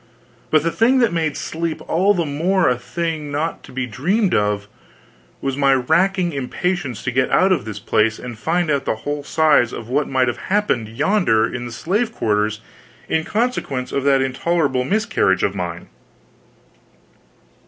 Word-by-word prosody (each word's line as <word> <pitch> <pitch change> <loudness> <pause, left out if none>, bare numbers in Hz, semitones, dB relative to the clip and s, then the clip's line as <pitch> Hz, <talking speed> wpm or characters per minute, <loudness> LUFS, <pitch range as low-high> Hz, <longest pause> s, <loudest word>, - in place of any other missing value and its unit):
But 155 -1 +3
the 165 - 0
thing 245 +7 +3
that 235 -7 +3
made 160 -3 -1
sleep 165 0 -3
all 195 +5 +3
the 170 -2 0
more 170 +6 +1
a 125 - +3
thing 160 +2 -4
not 150 +3 -2
to - - -14
be 130 0 -2
dreamed 180 - 0
of, 105 -1 0 0.7
was 135 -1 -2
my 140 -1 +3
racking 175 +7 +1
impatience 140 - -2
to 125 - -1
get 130 +1 +1
out 190 +1 +3
of 175 - +1
this 105 -2 -6
place 110 +2 +1
and 125 -2 -7
find 165 +7 0
out 140 -2 0
the - - 0
whole 145 0 -2
size 150 -6 +3
of 115 - -7
what 145 +3 0
might 130 -1 +2
have 120 - -1
happened 185 - +1
yonder 115 - +2
in 120 +1 -5
the - - -8
slave 210 - -1
quarters 105 - 0 0.5
in 160 - 0
consequence 210 - -2
of 140 - -1
that 135 -1 +4
intolerable 135 0 0
miscarriage 135 - +1
of 100 - +1
mine. 85 -3 -5
145 Hz, 170 wpm, -20 LUFS, 120-175 Hz, 0.7 s, that